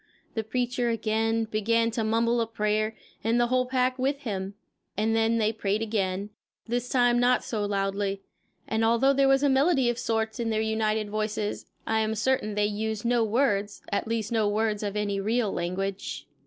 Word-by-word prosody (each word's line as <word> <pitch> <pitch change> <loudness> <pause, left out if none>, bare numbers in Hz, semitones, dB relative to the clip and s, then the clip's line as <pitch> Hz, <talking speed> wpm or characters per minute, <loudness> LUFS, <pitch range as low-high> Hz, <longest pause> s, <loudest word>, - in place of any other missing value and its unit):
The 225 - -2
preacher 245 +2 -1
again 225 0 0
began 230 +1 +1
to 225 0 -1
mumble 230 +2 +2
a 225 - -1
prayer, 215 0 0 0.3
and 230 +2 +2
the 240 - +4
whole 255 0 +2
pack 255 0 +1
with 275 +2 0
him; 200 -5 -4 0.4
and 220 +2 +1
then 225 +1 +2
they 220 0 +1
prayed 210 0 -1
again, 200 -2 -2 0.4
this 245 +1 -2
time 245 -2 +3
not 245 +1 +3
so 215 -3 -2
loudly. 195 0 -1 0.4
And 220 +1 0
although 235 +5 +4
there 275 0 +3
was 270 +1 +4
melody 270 -2 +3
of 240 - -6
a - - -5
sort 225 +1 -1
in 230 -1 -1
their 215 -1 0
united 220 -1 0
voices, 215 0 -2 0.2
I 220 0 +1
am 220 0 0
certain 225 -2 0
they 210 0 +2
used 215 +1 -2
no 240 -1 +3
words, 210 -3 0
at 200 - -1
least 225 -1 -2
no 220 -3 +2
words 215 0 0
of 205 -1 -3
any 205 -1 -1
real 220 +1 0
language. 190 +3 -3
220 Hz, 185 wpm, -27 LUFS, 210-240 Hz, 0.4 s, the